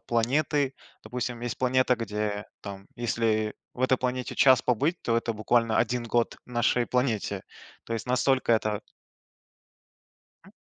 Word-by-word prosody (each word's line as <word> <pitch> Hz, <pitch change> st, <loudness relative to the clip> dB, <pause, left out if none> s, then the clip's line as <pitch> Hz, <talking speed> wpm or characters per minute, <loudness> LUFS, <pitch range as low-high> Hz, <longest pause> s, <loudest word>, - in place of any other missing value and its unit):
планеты, 135 Hz, +4 st, +1 dB, 0.3 s
допустим, 120 Hz, +1 st, -4 dB
есть 120 Hz, -2 st, -3 dB
планета, 130 Hz, 0 st, +3 dB
где 105 Hz, -2 st, -3 dB, 0.2 s
там, 100 Hz, -1 st, -8 dB
если 110 Hz, -2 st, 0 dB, 0.2 s
в 125 Hz, -, -9 dB
этой 130 Hz, 0 st, +4 dB
планете 125 Hz, 0 st, -2 dB
час 130 Hz, -3 st, +6 dB
побыть, 145 Hz, +9 st, +1 dB
то 115 Hz, -, +1 dB
это 115 Hz, 0 st, 0 dB
буквально 115 Hz, +1 st, +2 dB
1 120 Hz, +1 st, +1 dB
год 115 Hz, 0 st, 0 dB
нашей 120 Hz, 0 st, +1 dB
планете, 125 Hz, -4 st, -1 dB, 0.4 s
то 115 Hz, -, -6 dB
есть 115 Hz, +2 st, -3 dB
настолько 130 Hz, 0 st, +2 dB
это 105 Hz, -2 st, +1 dB, 1.6 s
Хм. -, -, -16 dB
120 Hz, 135 wpm, -27 LUFS, 110-125 Hz, 1.6 s, час